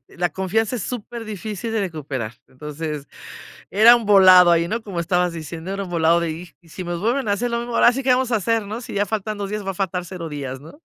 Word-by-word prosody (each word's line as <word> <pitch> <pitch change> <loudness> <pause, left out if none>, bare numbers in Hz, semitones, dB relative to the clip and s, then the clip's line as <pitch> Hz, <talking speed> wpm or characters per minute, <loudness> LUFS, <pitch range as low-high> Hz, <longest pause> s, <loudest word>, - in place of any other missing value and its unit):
la 175 0 0
confianza 205 +7 -1
es 230 - -4
súper 235 -1 -6
difícil 215 +1 -5
de 225 - 0
recuperar, 145 - -4
entonces, 150 +1 -6 0.6
era 220 +4 +7
un 235 -2 -3
volado 185 -3 +7
ahí, 170 0 +3
¿no?, 230 +6 -2
como 195 -5 -5
estabas 180 +1 +1
diciendo, 165 +2 -7
era 200 0 -3
un 180 - -9
volado 165 0 +3
de: 170 -1 -2 0.3
"Y 170 - -23
si 185 - -7
me 175 0 -3
vuelven 235 +8 -1
a 205 - +2
hacer 240 +4 -2
lo 235 - 0
mismo, 240 0 -5
ahora 240 - +5
sí 270 - -2
que 265 - -2
vamos 250 0 +2
a 230 - +3
hacer, 225 +1 0
¿no?, 215 +4 -6
si 230 - -8
ya 205 +1 +1
faltan 215 0 -3
2 200 -1 -5
días, 210 -1 -3
va 195 - -1
a - - -9
faltar 180 -1 -2
0 175 -2 -7
días", 140 -4 -6
¿no? 160 - -15
195 Hz, 250 wpm, -21 LUFS, 170-225 Hz, 0.6 s, era